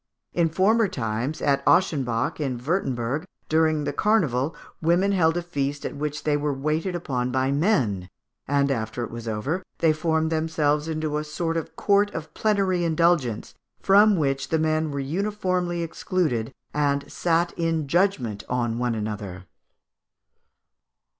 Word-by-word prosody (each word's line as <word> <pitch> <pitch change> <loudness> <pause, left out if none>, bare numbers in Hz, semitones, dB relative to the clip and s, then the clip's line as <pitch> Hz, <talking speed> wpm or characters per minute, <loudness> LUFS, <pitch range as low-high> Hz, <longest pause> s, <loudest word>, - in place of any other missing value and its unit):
In 170 -2 +2
former 210 +7 +3
times, 120 - -3
at 140 -1 +2
Ochsenbach, 130 -11 +2
in 135 -5 -1
Wurtemberg, 130 -2 -1 0.3
during 155 -1 +2
the 145 0 -2
carnival, 155 - +1 0.3
women 175 +5 +3
held 165 -3 +3
a 175 - -2
feast 145 -4 -3
at - - -4
which 150 +1 -3
they 150 -1 +2
were 145 -1 -1
waited 155 +6 -1
upon 130 -7 -2
by 130 +1 +1
men, 130 - +1 0.4
and, 140 0 +2
after 110 -1 -2
it - - -6
was 115 0 -7
over, 130 - -2 0.2
they 160 -2 +3
formed 160 0 0
themselves 155 -2 +1
into 155 -2 -1
a - - -3
sort 165 +2 -3
of 165 - -4
court 205 0 +3
of 155 -1 -6
plenary 195 -4 +1
indulgence, 165 -8 +1 0.3
from 205 +2 +5
which 135 -3 0
the 160 - +2
men 155 0 +1
were 140 -1 -3
uniformly 180 +2 -1
excluded, 155 -8 -1 0.2
and 140 -1 0
sat 170 0 +1
in 165 -3 -1
judgment 135 - +1
on 120 -2 -1
one 120 -2 0
another. 105 -4 -5
155 Hz, 145 wpm, -25 LUFS, 130-170 Hz, 0.4 s, from